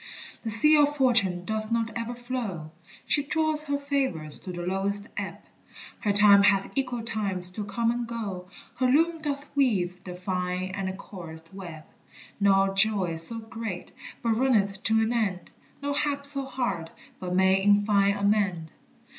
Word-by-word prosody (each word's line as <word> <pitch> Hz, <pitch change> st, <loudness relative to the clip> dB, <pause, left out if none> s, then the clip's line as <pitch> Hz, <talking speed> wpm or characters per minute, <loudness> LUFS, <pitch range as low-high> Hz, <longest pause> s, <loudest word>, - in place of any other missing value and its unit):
The 225 Hz, -, -4 dB
sea 265 Hz, +9 st, +7 dB
of 295 Hz, 0 st, +3 dB
Fortune 210 Hz, -10 st, +2 dB
doth 215 Hz, +1 st, -4 dB
not 230 Hz, -1 st, 0 dB
ever 235 Hz, +1 st, -4 dB
flow, 235 Hz, -11 st, -5 dB, 0.3 s
She 290 Hz, -, +1 dB
draws 310 Hz, +1 st, 0 dB
her 285 Hz, -1 st, -1 dB
favors 265 Hz, -, -2 dB
to 185 Hz, -, -8 dB
the 175 Hz, -1 st, -6 dB
lowest 200 Hz, +2 st, -2 dB
ebb; -, -, -5 dB, 0.6 s
Her 205 Hz, -, 0 dB
time 200 Hz, 0 st, +7 dB
hath 195 Hz, -1 st, +2 dB
equal 250 Hz, -4 st, -2 dB
times 195 Hz, -5 st, 0 dB
to 210 Hz, +3 st, -5 dB
come 230 Hz, +3 st, 0 dB
and 240 Hz, 0 st, -3 dB
go, 200 Hz, -6 st, -6 dB, 0.3 s
Her 255 Hz, +1 st, +2 dB
loom 325 Hz, +5 st, +2 dB
doth 285 Hz, -1 st, -3 dB
weave 185 Hz, -10 st, 0 dB
the 180 Hz, -1 st, -8 dB
fine 180 Hz, 0 st, -3 dB
and 190 Hz, -1 st, -4 dB
coarsest 165 Hz, -4 st, -11 dB
web; 170 Hz, -5 st, -9 dB, 0.6 s
No 195 Hz, -1 st, +3 dB
joy 195 Hz, -3 st, +4 dB
so 165 Hz, +8 st, -3 dB
great 220 Hz, -4 st, -7 dB, 0.3 s
but 230 Hz, -, +1 dB
runneth 205 Hz, -7 st, +1 dB
to 220 Hz, 0 st, +3 dB
an 225 Hz, +2 st, -1 dB
end, 195 Hz, -6 st, -2 dB, 0.3 s
No 285 Hz, 0 st, -1 dB
hap 280 Hz, -1 st, -1 dB
so 280 Hz, -1 st, +2 dB
hard 200 Hz, -11 st, -3 dB, 0.3 s
but 180 Hz, -1 st, -4 dB
may 190 Hz, +1 st, +3 dB
in 205 Hz, +1 st, +3 dB
fine 200 Hz, -1 st, +2 dB
amend. 200 Hz, -6 st, 0 dB
205 Hz, 165 wpm, -26 LUFS, 185-245 Hz, 0.6 s, sea